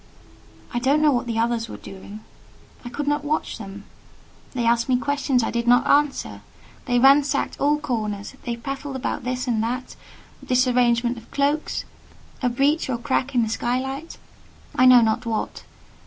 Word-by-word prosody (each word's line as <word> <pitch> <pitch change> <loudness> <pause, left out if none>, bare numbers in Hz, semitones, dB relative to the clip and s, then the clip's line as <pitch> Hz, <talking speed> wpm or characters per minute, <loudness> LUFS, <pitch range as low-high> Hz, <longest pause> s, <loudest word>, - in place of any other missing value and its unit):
I 240 - 0
don't 270 +5 +2
know 300 - +5
what 245 -1 -1
the 230 -1 -2
others 230 0 0
were - - -7
doing; 200 +2 -10 0.6
I 240 - -6
could 290 +3 -4
not 290 0 +1
watch 300 -4 -2
them: 200 -1 -9 0.7
they 240 -2 0
asked 235 +1 +2
me 255 - +4
questions 275 -2 0
I - - -1
did 235 0 -2
not 245 0 +5
answer; 290 -1 +1 0.4
they 245 -2 +1
ransacked 275 +2 +3
all 295 +1 +3
corners; 215 -8 -3
they 235 - -3
prattled 275 +3 -5
about 265 -1 -3
this 255 +1 -3
and 230 -3 +1
that 250 +3 -3 0.5
disarrangement 245 -1 +2
of 225 - -19
cloaks, 290 +2 -1 0.6
a 250 - +2
breach 280 +5 +1
or 250 - 0
crack 265 +2 -1
in 240 - +4
the - - -1
sky 240 +3 0
light—I 265 -2 -3
know 250 -1 +8
not 220 +1 0
what. 220 -1 -3
250 Hz, 170 wpm, -23 LUFS, 235-275 Hz, 0.7 s, know